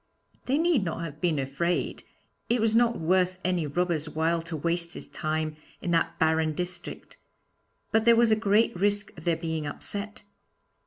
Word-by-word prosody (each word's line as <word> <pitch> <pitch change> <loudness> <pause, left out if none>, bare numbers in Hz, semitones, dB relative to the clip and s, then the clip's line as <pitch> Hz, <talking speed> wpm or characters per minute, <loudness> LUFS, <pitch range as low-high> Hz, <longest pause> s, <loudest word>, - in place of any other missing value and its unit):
They 270 +3 +2
need 325 - +3
not 165 -2 -3
have 155 -2 -7
been 170 -4 +1
afraid; 140 +6 -1 0.5
it 240 +1 +2
was 220 0 +2
not 235 0 +4
worth 185 +2 +2
any 180 -4 +1
robber's 165 0 -1
while 165 +2 0
to 165 -1 -6
waste 170 +2 -1
his - - -7
time 155 -1 -2 0.2
in 175 - -3
that 165 -1 +1
barren 160 -1 +2
district; 180 0 -5 0.7
but 220 0 +3
there 235 0 +6
was 230 -1 +4
a - - +6
great 215 0 +2
risk 205 +2 0
of 160 - -12
their 170 -2 +2
being 160 -2 -3
upset. 205 +8 -4
175 Hz, 170 wpm, -27 LUFS, 160-205 Hz, 0.7 s, there